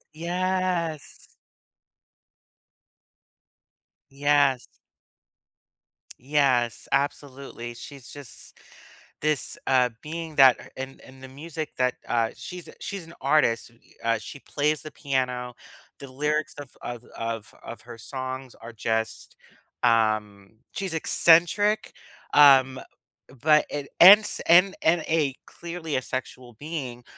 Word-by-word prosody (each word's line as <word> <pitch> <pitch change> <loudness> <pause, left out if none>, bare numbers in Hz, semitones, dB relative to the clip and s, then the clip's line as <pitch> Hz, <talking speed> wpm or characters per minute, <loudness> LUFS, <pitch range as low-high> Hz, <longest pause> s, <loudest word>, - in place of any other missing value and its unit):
Yes. 175 -2 -2 2.8
Yes. 140 -2 +2 1.5
Yes, 130 -4 +1
absolutely, 140 -3 -3
she's 135 +2 -11
just 145 -4 -11 0.6
this, 150 -2 -1
uh, 130 -2 +4
being 160 0 -6
that 135 -3 +5
and 135 0 -7
and 130 0 -16
the - - -8
music 155 +3 -7
that, 125 -1 +1
uh 115 -1 +1
She's, 180 -1 -9
uh - - -12
she's 195 -4 -6
an 165 - -14
artist, 135 -5 +2 0.3
uh, 115 0 +2
she 140 - -9
plays 150 +2 -1
the 155 - -9
piano, 125 -3 -2 0.4
the 140 -2 -10
lyrics 150 +3 -1
of 145 -3 -10
of 120 -1 -7
of 115 -1 -5
of - - -9
her - - -11
songs 130 +1 -6
are 115 +1 -11
just, 110 0 -3 0.5
um 110 -3 +1 0.2
she's 190 -3 -4
eccentric, 175 +6 +3 0.4
um, 135 -3 +6 0.6
but 150 0 +5
and 145 -1 -4
and 195 +4 +11
s 210 - -4
and 180 +3 +6
and 165 +1 +3
a 150 -5 +1
clearly 170 -3 -6
asexual 130 -1 -6
being, 140 -6 -6
140 Hz, 110 wpm, -25 LUFS, 125-160 Hz, 2.8 s, and